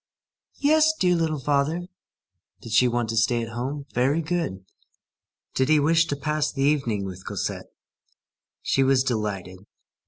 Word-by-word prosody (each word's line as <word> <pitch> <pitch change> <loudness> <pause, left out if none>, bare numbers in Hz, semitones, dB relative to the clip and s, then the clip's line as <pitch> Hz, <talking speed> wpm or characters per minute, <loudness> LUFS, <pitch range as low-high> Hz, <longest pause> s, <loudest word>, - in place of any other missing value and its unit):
"Yes, 310 +2 +3
dear 180 -1 +3
little 160 -2 0
father." 145 +5 0 0.8
Did 115 - -10
she 120 +3 +5
want 120 -2 -1
to 115 - -2
stay 115 +2 +2
at 115 - -6
home? 135 +4 -4
Very 135 +7 +1
good. 155 - -3 0.9
Did 130 +2 +1
he 155 -1 +5
wish 165 +3 +3
to 145 - -2
pass 150 +1 -1
the 135 -1 -2
evening 135 -9 +1
with 95 -1 -8
Cosette? - - -4 0.9
She 135 - +1
was 135 -1 +3
delighted. 100 -7 -3
135 Hz, 150 wpm, -24 LUFS, 115-155 Hz, 0.9 s, she